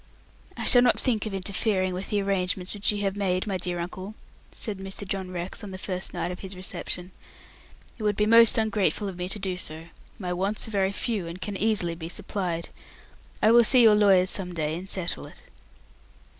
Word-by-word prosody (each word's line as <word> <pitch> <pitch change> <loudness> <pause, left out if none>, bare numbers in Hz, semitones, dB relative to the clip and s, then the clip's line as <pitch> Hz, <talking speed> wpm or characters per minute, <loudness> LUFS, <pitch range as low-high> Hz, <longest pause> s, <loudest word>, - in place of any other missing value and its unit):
"I - - -3
shall 245 - +7
not 245 - +4
think 225 -4 0
of 210 - -5
interfering 190 0 0
with 185 +2 -3
the 205 -1 +1
arrangements 185 -1 -1
which 205 0 +1
you 205 -1 -3
have 195 0 0
made, 185 -2 0
my 195 -3 -1
dear 175 0 -2
uncle," 185 +4 -6 0.4
said 210 -4 -4
Mr. 195 +1 -7
John 190 -1 -3
Rex, 180 +2 -5
on 205 - -6
the 190 - -7
first 185 -1 -3
night 175 - -3
of 180 - -7
his 190 0 -7
reception. 180 0 -3 0.9
"It - - -5
would 210 -1 +2
be 210 - +2
most 230 +1 +7
ungrateful 215 -2 +1
of 190 - -5
me 180 0 -4
to 205 - -2
do 190 -2 -2
so. 165 -1 -2 0.3
My 180 -3 -3
wants 195 +5 -1
are - - -8
very 195 -2 +1
few, 205 -3 -2
and 170 +2 -7
can 200 +2 -4
easily 200 -4 +1
be 165 0 -7
supplied. 180 -3 -3 0.7
I 215 - +6
will 235 0 +7
see 245 +2 +5
your 220 -2 +8
lawyers 195 -3 +5
some 180 -3 -2
day, 155 -1 -1
and 185 +3 -7
settle 185 -3 -2
it." - - -14
190 Hz, 210 wpm, -26 LUFS, 180-210 Hz, 0.9 s, your